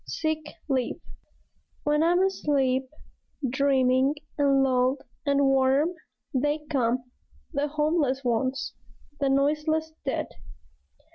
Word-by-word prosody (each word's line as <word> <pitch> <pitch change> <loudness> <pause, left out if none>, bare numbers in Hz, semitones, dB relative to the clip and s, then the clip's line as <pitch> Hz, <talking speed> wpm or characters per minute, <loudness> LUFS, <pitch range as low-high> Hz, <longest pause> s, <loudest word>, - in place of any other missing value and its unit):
SICK 315 -1 -3
LEAVE 260 -4 -1 0.8
When 300 +1 +2
I'm 350 +3 +4
asleep, 270 -8 +1 0.6
dreaming 265 +1 +2 0.2
and 275 -2 +3
lulled 255 +1 +1 0.2
and 280 0 +3
warm, 270 +5 +3 0.4
They 295 +3 0
come, 250 -2 0 0.4
the 290 0 0
homeless 300 -3 0
ones, 255 +2 -1 0.5
the 280 -2 +1
noiseless 305 +3 +1
dead. 270 - -1
275 Hz, 95 wpm, -26 LUFS, 260-300 Hz, 0.8 s, I'm